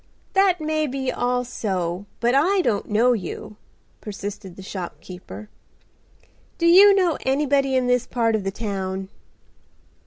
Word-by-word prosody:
"That 385 -2 +3
may 310 0 -1
be 265 -1 -2
all 245 0 0
so, 190 -5 -3
but 240 +1 +2
I 365 +8 +3
don't 205 - -1
know 230 +4 +3
you," 210 0 -6 0.4
persisted 205 -2 -7
the 190 - -11
shopkeeper. 185 +2 -8 1.1
"Do 335 - -1
you 390 +4 +8
know 355 -6 +1
anybody 275 0 +1
in 255 -1 +2
this 250 0 +1
part 230 -2 0
of 210 - -2
the 195 - -1
town?" 195 -2 -4
240 Hz, 135 wpm, -23 LUFS, 200-285 Hz, 1.1 s, you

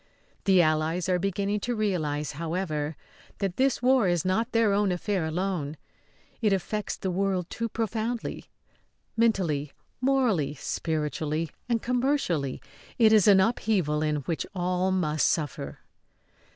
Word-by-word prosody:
The 190 -3 +6
Allies 155 +3 +1
are 180 -1 +2
beginning 200 +2 -1
to 240 +4 -2
realise, 155 -9 -1
however, 160 -1 -3 0.4
that 195 -3 -2
this 265 -2 +2
war 255 -5 +4
is 175 -2 +1
not 220 +6 +1
their 225 -3 +3
own 200 -1 +2
affair 180 -1 -1
alone. 160 -3 -2 0.6
It 215 -3 +3
affects 200 +2 -2
the 190 - -2
world 185 -1 0
too 230 0 -3
profoundly. 225 +1 -3 0.7
Mentally, 175 -11 +1 0.3
morally, 245 - +2
spiritually 155 +1 -2 0.2
and 230 -2 +1
commercially, 245 - 0 0.3
it 220 -2 +6
is 215 -3 +5
an 200 -2 +7
upheaval 190 -7 +1
in 155 -1 +1
which 160 +4 -3
all 180 +1 0
must 155 -5 +1
suffer. 150 -4 -2
185 Hz, 130 wpm, -27 LUFS, 155-220 Hz, 0.7 s, an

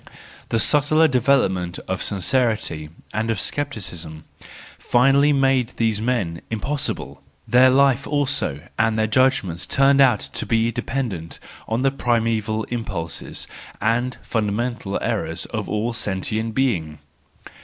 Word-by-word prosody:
The 115 - +1
subtler 150 +5 +4
development 115 - +1
of 95 0 -2
sincerity 105 - 0 0.2
and 110 +1 -1
of 110 -4 0
scepticism 90 - -4 0.6
finally 135 +4 +4
made 135 -3 +2
these 110 -2 +1
men 105 -9 -1
impossible; 140 +7 -3 0.3
their 125 +1 +6
life 135 0 +3
also 140 - -1 0.2
and 110 0 +2
their 110 - +2
judgments 110 -8 +1
turned 140 0 +4
out 125 -6 +4
to - - -5
be 115 0 +2
dependent 115 -8 -4 0.3
on 115 +3 -1
the 135 - +3
primeval 115 -4 0
impulses 100 -9 -4 0.3
and 120 +4 0
fundamental 110 -1 -2
errors - - -2
of - - -3
all 110 +3 -1
sentient 110 +2 -2
being. 85 - 0
115 Hz, 120 wpm, -22 LUFS, 100-130 Hz, 0.6 s, their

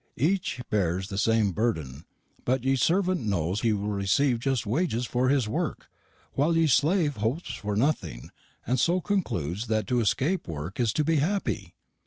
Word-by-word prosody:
Eche 160 -2 0
bears 95 -2 0
the 95 - -4
same 110 -1 +3
burden; 80 - -2 0.4
butt 130 0 0
ye 135 +1 +2
servent 180 +6 +2
knows 95 -1 -1
he 115 - +2
will 105 0 -1
recieve 105 +6 +1
just 130 -2 -1
wages 125 - 0
for 125 +2 +1
his 135 -5 +2
work, 105 - -3 0.4
wile 160 +4 +2
ye 165 - +4
slave 155 - +2
hopes 115 +11 -2
for 105 -1 -3
nothing, 110 - -1 0.3
and 125 +1 +1
so 175 +7 +3
conkludes 115 - -2
that 110 -1 0
to 125 -1 +1
escape 140 - 0
work 80 +5 -6
is 120 -3 +2
to 150 - 0
be 160 +1 +2
happy!' 190 +8 -1
120 Hz, 170 wpm, -27 LUFS, 105-150 Hz, 0.4 s, ye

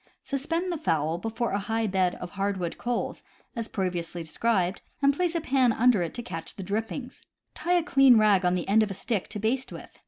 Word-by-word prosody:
Suspend 330 +6 -2
the 335 - -3
fowl 160 - 0
before 225 +4 -2
a 200 - 0
high 225 +3 -1
bed 185 -3 +1
of 180 - -8
hardwood 195 -3 -2
coals, 245 -1 -2 0.3
as 230 -1 -3
previously 175 -3 -3
described, 185 +2 0 0.2
and 280 0 +4
place 350 +1 0
a 335 - 0
pan 260 -4 +3
under 230 -3 +4
it 170 - -3
to 240 - -4
catch 165 -9 -6
drippings. 220 +6 -4 0.3
Tie 350 - -1
a 345 - +1
clean 270 -7 +6
rag 210 -3 +4
on 180 0 +2
the 180 - -3
end 210 +3 +5
of 215 - +1
a 195 - -5
stick 205 0 -2
to - - -6
baste 235 +5 -1
with. - - -11
220 Hz, 210 wpm, -27 LUFS, 185-250 Hz, 0.3 s, clean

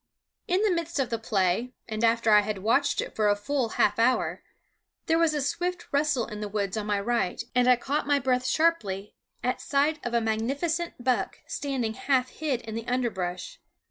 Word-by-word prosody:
In 370 +4 +2
the 425 - +3
midst 335 -1 -2
of 265 -3 0
the 230 - -1
play, 215 +3 0
and 220 0 -3
after 230 -1 +3
I 210 0 +7
had 205 -2 -4
watched 270 +6 +2
it - - -7
for 210 -1 +2
a 205 - +4
full 240 +4 -1
half - - +3
hour, 250 +3 +2 0.6
there 325 0 +2
was 325 -2 +3
a 295 - 0
swift 350 +6 -2
rustle 285 -4 +1
in 210 -1 -7
the 210 - -3
woods 200 -1 -2
on 215 -1 -3
my 205 -1 +1
right, 230 -3 -1
and 250 0 +3
I 250 - +7
caught 275 +4 -2
my 290 -1 +4
breath 255 -1 0
sharply 210 - +1 0.3
at 250 - -1
sight 295 +2 +1
of 240 0 -2
a - - +5
magnificent 275 +10 -1
buck 240 -6 0
standing 275 -8 -2
half 260 +1 +1
hid 285 -6 -2
in 220 - -8
the 230 +1 -5
underbrush. 235 - -2
250 Hz, 200 wpm, -27 LUFS, 215-290 Hz, 0.6 s, I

